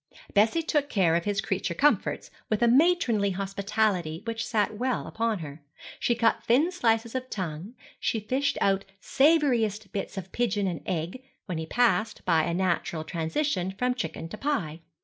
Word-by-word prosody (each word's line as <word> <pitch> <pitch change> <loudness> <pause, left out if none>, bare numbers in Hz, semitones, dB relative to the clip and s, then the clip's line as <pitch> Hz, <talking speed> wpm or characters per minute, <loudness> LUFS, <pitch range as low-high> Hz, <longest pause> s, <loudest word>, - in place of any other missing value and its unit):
Bessie 220 +11 +3
took 295 -3 0
care 185 - +3
of 170 - 0
his 205 -1 0
creature 190 -4 -2
comforts 295 - +1 0.2
with 215 +1 +1
a - - +5
matronly 245 - +3
hospitality 195 -3 -1
which 230 0 -3
sat 210 -1 0
well 255 0 -1
upon 225 -1 -1
her. 145 +1 -10 0.4
She 240 - +1
cut 230 -1 +2
thin 285 +10 +3
slices 225 -8 +1
of 255 0 -4
tongue, 185 +4 -5 0.2
she 225 - 0
fished 260 +7 -1
out 195 0 +2 0.2
savouriest 245 - +2
bits 200 0 -4
of 190 -1 -6
pigeon 210 -4 0
and 175 -4 -2
egg, 175 +8 -3 0.2
when 180 -5 -4
he 160 - -5
passed, 225 -1 +1
by 165 -4 +3
a 170 - -1
natural 175 -3 -1
transition, 185 - -2
from 250 0 +1
chicken 165 -7 -4
to 215 - -8
pie. 175 - -2
210 Hz, 170 wpm, -27 LUFS, 185-245 Hz, 0.4 s, a